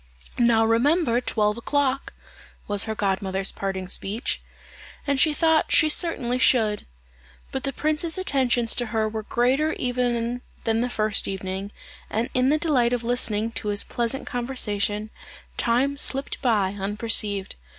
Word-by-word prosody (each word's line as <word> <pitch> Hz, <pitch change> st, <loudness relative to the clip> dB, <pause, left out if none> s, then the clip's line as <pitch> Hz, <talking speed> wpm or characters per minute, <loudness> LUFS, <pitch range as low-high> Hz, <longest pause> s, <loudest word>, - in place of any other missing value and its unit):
"Now 230 Hz, -2 st, +4 dB
remember 245 Hz, +2 st, +2 dB
twelve 210 Hz, -2 st, 0 dB
o'clock," 275 Hz, +1 st, -1 dB, 0.5 s
was 205 Hz, -1 st, +3 dB
her 220 Hz, -1 st, -3 dB
godmother's 195 Hz, -1 st, 0 dB
parting 190 Hz, -1 st, -4 dB
speech; 205 Hz, +6 st, -2 dB, 0.6 s
and 280 Hz, -2 st, 0 dB
she 310 Hz, -, +4 dB
thought 320 Hz, +1 st, +2 dB
she 310 Hz, -, +5 dB
certainly 255 Hz, -7 st, +1 dB
should. 220 Hz, -5 st, +2 dB, 0.6 s
But 265 Hz, 0 st, -3 dB
the 275 Hz, -, -1 dB
prince's 310 Hz, +4 st, 0 dB
attentions 255 Hz, -9 st, +1 dB
to 240 Hz, -, -1 dB
her 220 Hz, 0 st, 0 dB
were 220 Hz, 0 st, -4 dB
greater 260 Hz, +8 st, +1 dB
even 245 Hz, -1 st, -1 dB, 0.2 s
than 225 Hz, 0 st, +1 dB
the 250 Hz, -, -1 dB
first 215 Hz, -3 st, +1 dB
evening, 190 Hz, +1 st, -4 dB, 0.4 s
and 225 Hz, +3 st, -2 dB
in 255 Hz, +1 st, +2 dB
the 300 Hz, -, +3 dB
delight 265 Hz, -7 st, +2 dB
of 240 Hz, -1 st, -1 dB
listening 230 Hz, -2 st, +1 dB
to 220 Hz, -, -4 dB
his 205 Hz, -1 st, +1 dB
pleasant 240 Hz, +3 st, -2 dB
conversation, 215 Hz, -4 st, -2 dB, 0.4 s
time 260 Hz, +4 st, +1 dB
slipped 275 Hz, 0 st, +1 dB
by 205 Hz, -6 st, +1 dB
unperceived. 205 Hz, -1 st, -1 dB
235 Hz, 140 wpm, -24 LUFS, 210-265 Hz, 0.6 s, she